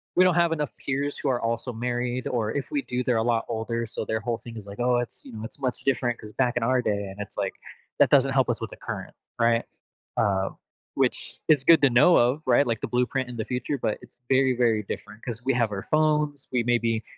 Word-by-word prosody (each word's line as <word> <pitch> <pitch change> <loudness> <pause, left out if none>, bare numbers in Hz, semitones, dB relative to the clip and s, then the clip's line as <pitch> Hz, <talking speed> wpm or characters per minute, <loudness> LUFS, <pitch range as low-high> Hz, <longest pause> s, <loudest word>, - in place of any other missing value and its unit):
we 185 - +6
don't 185 - +5
have 170 -1 +3
enough 150 -2 -1
peers 140 +1 -1
who 140 - -1
are 125 -2 +1
also 115 +2 -2
married 120 +1 -2
or 110 -3 -1
if 140 - -4
we 290 -2 0
do, 125 - -3
they're 120 -2 +1
a 110 - +2
lot 115 -1 +1
older, 115 +1 -2
so 110 - -4
their 110 +1 -1
whole 115 0 -2
thing 115 -1 -10
is, 105 - -8
like, 100 +3 -10
"Oh, 125 0 +3
it's, 120 -1 -4
you - - -10
know, 110 0 -7
it's 115 - -9
much 130 -2 -2
different 125 -3 +1
'cause 105 - -10
back 125 -2 +1
in 120 - 0
our 130 +1 +2
day" 100 -3 -1
And 95 - -12
it's 100 - -8
like, - - -1 0.5
that - - +6
doesn't 135 -1 +4
help 130 -2 +3
us 115 - 0
with - - -4
the - - -10
current, - - -6 0.3
right? 115 0 +3 0.5
Uh, 95 -1 +2 0.5
which - - 0
is 145 -4 +4
good 165 +1 +6
to 140 - +7
know 130 +9 +6
of, 125 +6 +3
right? 130 +3 +5
Like, 115 -2 -1
the - - -2
blueprint 125 +1 0
in 120 - -7
the 110 - -2
future, 125 +3 -2
but 110 -3 -2
it's 125 0 -17
very, 130 0 +4
very 115 -3 +2
different 105 +2 -7
'cause 120 0 -5
we 135 - +3
have 115 -3 +1
our 100 -1 -4
phones, 150 -2 +1
we 125 -2 +1
maybe 115 -2 +1
120 Hz, 250 wpm, -26 LUFS, 115-135 Hz, 0.5 s, to